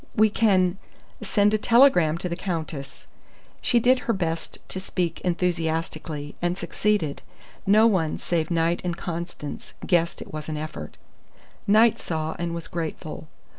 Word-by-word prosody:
"We 215 0 +5
can 190 -4 +3 0.4
send 205 0 +2
a 215 - +2
telegram 210 - +5
to 180 - -3
the 170 - -2
Countess." 160 -7 -5 0.6
She 240 - +3
did 250 +2 +4
her - - +5
best 165 -4 -3
to 190 - -3
speak 180 -3 -2
enthusiastically, 165 -4 -2
and 175 +1 0
succeeded. 205 -9 0 0.5
No 215 +3 +6
one 185 -8 +2
save 165 -2 -1
Knight 170 0 +1
and 175 -1 -2
Constance 170 -4 -6
guessed 170 -2 +2
it - - -10
was 155 0 -5
an 155 - -3
effort. 155 +1 -6 0.7
Knight 220 +3 +5
saw, 160 -1 -3
and 170 -1 -2
was 170 - -5
grateful. 160 -2 -5
175 Hz, 145 wpm, -25 LUFS, 160-200 Hz, 0.7 s, No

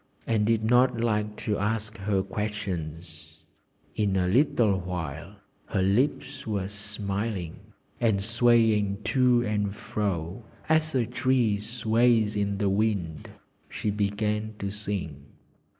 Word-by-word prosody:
_" - - -39 0.2
and 105 -2 +1
did 115 -1 +2
not 125 +1 +4
like 105 -2 0
to 105 -1 -2
ask 110 +1 -1
her 95 -1 0
questions. 85 -6 -5 0.6
In 100 -3 +1
a 90 -1 +2
little 110 -3 +3
while 90 0 -5 0.3
her 95 - 0
lips 130 +6 0
were 100 -3 -1
smiling, 100 -2 -4 0.4
and 110 -4 +2
swaying 110 -2 +3
to 120 +1 +3
and 105 -1 -1
fro, 95 -1 -3 0.2
as 155 -1 +2
a 125 -3 +2
tree 125 -3 +1
sways 115 0 +2
in 100 -1 0
the 100 - 0
wind, 95 -7 -1 0.4
she 105 - -2
began 105 +1 -1
to 100 -1 -3
sing. 100 -9 -4
105 Hz, 125 wpm, -27 LUFS, 100-115 Hz, 0.6 s, not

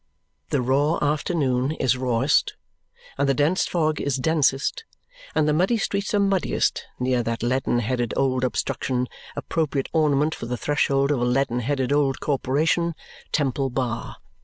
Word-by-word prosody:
The 135 -3 0
raw 145 +6 +2
afternoon 145 -3 0
is 130 -5 +1
rawest, 125 +2 +1 0.6
and 140 0 +2
the 135 - +3
dense 150 +7 +2
fog 155 -3 0
is 140 -2 0
densest, 145 - +1 0.5
and 155 - +3
the 150 - +3
muddy 185 +9 +2
streets 200 0 -1
are - - +3
muddiest 195 -2 0
near 125 -1 +1
that 115 -1 -3
leaden 125 0 +1
headed 120 0 -1
old 130 -1 +1
obstruction, 125 0 -1 0.3
appropriate 150 -4 -2
ornament 150 -1 +2
for 115 - -6
the 125 0 -3
threshold 140 0 +1
of 135 -4 0
a - - +2
leaden 125 -1 +1
headed 130 +2 0
old 140 -2 +1
corporation, 155 +4 0 0.4
Temple 135 -2 0
Bar. 120 -2 -3
140 Hz, 150 wpm, -24 LUFS, 125-155 Hz, 0.6 s, the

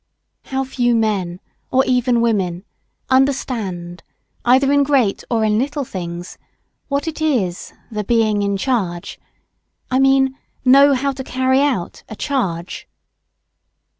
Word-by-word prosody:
"] - - -54
How 265 0 -2
few 245 -2 0
men, 195 -6 -1 0.3
or 265 +1 +3
even 250 -1 +2
women, 190 -6 0 0.5
understand, 220 -10 0 0.4
either 265 +3 +4
in 285 0 +4
great 270 -8 +1
or 225 -2 +1
in 215 0 +2
little 285 +2 -2
things, 175 -3 -7 0.5
what 280 +2 -2
it 315 -1 -5
is 225 - -1 0.2
the 210 -1 -3
being 215 -1 +2
"in 200 0 0
charge" 190 -8 -2 0.7
I 260 - +2
mean, 270 0 +3 0.3
know 275 +2 +6
how 275 +2 0
to 265 0 -6
carry 260 +1 +1
out 260 -12 -1
a 215 - -7
"charge." 190 - -3
245 Hz, 135 wpm, -19 LUFS, 195-270 Hz, 0.7 s, know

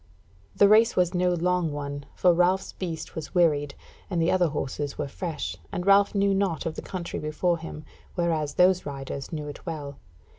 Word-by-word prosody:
The 200 - +6
race 220 +3 +5
was 180 0 +2
no 180 0 +2
long 175 -1 +1
one, 145 -1 -5
for 180 -1 +4
Ralph's 180 +2 +2
beast 165 -4 -5
was 160 +3 -7
wearied, 145 -5 +2 0.3
and 180 -3 -1
the 165 +1 +2
other 180 -2 +3
horses 145 -1 -3
were 150 - -2
fresh, 150 - -4 0.2
and 180 - -3
Ralph 200 +1 +5
knew 200 0 +3
naught 195 -4 0
of 165 - -2
the - - -6
country 180 -3 -5
before 170 +3 0
him, 155 -2 -8 0.3
whereas 160 -4 0
those 180 0 +4
riders 135 0 -6
knew 150 -2 -4
it 145 - -9
well. 145 -4 -6
170 Hz, 185 wpm, -26 LUFS, 150-180 Hz, 0.3 s, The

